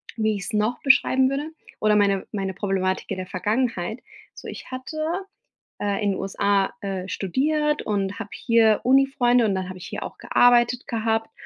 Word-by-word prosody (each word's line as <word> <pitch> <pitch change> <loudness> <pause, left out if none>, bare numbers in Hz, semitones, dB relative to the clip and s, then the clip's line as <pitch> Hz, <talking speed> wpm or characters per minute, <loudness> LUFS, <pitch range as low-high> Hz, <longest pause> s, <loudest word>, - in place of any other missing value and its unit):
Wie 220 -1 +1
ich's 200 +1 -6
noch 215 +3 0
beschreiben 265 -1 +4
würde, 285 +3 -3 0.3
oder 215 0 +4
meine 200 -2 +2
meine 195 -2 -3
Problematik 190 -1 -2
in - - -2
der 185 - -4
Vergangenheit. 220 +1 -1 0.3
So - - -11
ich - - -9
hatte, 255 +4 -6 0.8
äh, 205 +1 -1
in 200 - +2
USA, 195 0 0
äh, 190 -2 -4
studiert 300 - 0
und 200 -1 -2
habe 220 -2 -6
hier 225 -2 +3
Unifreunde 255 -2 +3
und 200 -3 +1
dann 185 -1 -3
habe 185 - -7
ich - - -9
hier - - -5
auch - - -8
gearbeitet 245 0 +3
gehabt 225 0 -1
215 Hz, 170 wpm, -24 LUFS, 195-250 Hz, 0.8 s, beschreiben